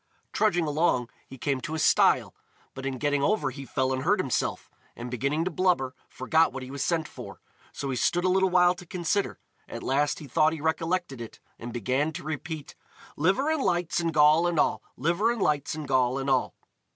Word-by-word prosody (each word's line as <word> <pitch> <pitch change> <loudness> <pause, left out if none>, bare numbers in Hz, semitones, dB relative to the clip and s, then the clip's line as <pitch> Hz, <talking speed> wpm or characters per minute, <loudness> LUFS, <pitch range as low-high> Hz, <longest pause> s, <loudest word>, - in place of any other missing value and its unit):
Trudging 175 -6 +2
along, 150 -5 +1 0.2
he 135 - -11
came 135 0 -1
to 155 - -4
a - - -2
stile; - - +3 0.4
but 135 0 -5
in 135 -1 -3
getting 145 +1 0
over 145 -4 +1
he 135 +2 -8
fell 130 0 0
and 130 - -2
hurt - - +2
himself, - - -1 0.3
and 120 +1 -7
beginning 140 +6 -1
to 185 - -1
blubber, 170 -7 +1 0.2
forgot 160 +5 +2
what 135 - -6
he 130 - -9
was 140 -1 -3
sent 165 -2 0
for. - - -10 0.3
So 140 -1 -4
he - - -2
stood 175 +8 +1
a - - +3
little 190 +1 +3
while 180 0 +5
to 180 0 -12
consider: 180 +3 -1 0.3
at - - -7
last 145 +2 +1
he 155 - -9
thought 155 +4 +3
he 160 - -5
recollected 160 -3 -1
it, 115 - -9 0.2
and 120 +1 -6
began 130 +6 0
to - - -7
repeat: 155 0 -5 0.4
"Liver 195 - +2
and 315 -3 0
lights 175 -5 0
and 165 -1 0
gall 155 +2 +5
and 170 -3 0
all! - - +2 0.2
Liver 175 - +1
and 235 - -6
lights 145 -1 0
and 155 -2 -6
gall 130 -1 +2
and 135 0 -1
all!" 130 -1 +1
150 Hz, 210 wpm, -27 LUFS, 135-175 Hz, 0.4 s, while